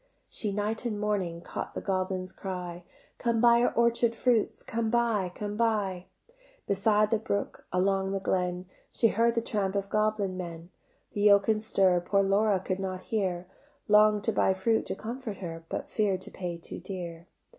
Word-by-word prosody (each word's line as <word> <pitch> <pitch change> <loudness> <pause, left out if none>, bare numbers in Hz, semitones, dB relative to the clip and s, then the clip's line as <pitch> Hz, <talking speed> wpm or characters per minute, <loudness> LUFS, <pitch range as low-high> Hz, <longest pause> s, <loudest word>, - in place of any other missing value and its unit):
She 210 - -3
night 210 +3 -1
and 220 -4 -2
morning 190 -5 -1
Caught - - -6
the - - -3
goblins' 185 -1 -2
cry: 180 -2 -6 0.4
"Come 235 -2 +1
buy 235 0 +6
our 245 - +3
orchard 235 0 +2
fruits, 235 -2 +1
Come 230 -1 -2
buy, 225 -6 +1
come 205 0 -4
buy;" 205 -5 0 0.6
Beside 210 +2 +2
the 225 - +3
brook, 200 -2 -3
along 190 +1 +1
the 195 - -1
glen, 180 -1 -1 0.3
She 230 - +3
heard 230 +2 +2
the 230 - +2
tramp 200 -3 -1
of 200 0 -1
goblin 215 -3 +1
men, 170 -1 -7 0.4
The 205 - -2
yoke 200 0 +5
and 215 -1 +2
stir 190 -4 +3
Poor 195 +3 +2
Laura 200 0 +3
could 185 0 -3
not 185 -1 -3
hear; 185 -5 0 0.4
Long'd 210 0 +5
to 225 - +1
buy 190 - +3
fruit 220 +4 +1
to - - -3
comfort 230 -2 -6
her, 165 -3 -7
But - - -4
fear'd 200 -4 0
to - - -9
pay 175 -2 -5
too 170 - -8
dear. 170 -3 -7
200 Hz, 175 wpm, -29 LUFS, 185-220 Hz, 0.6 s, buy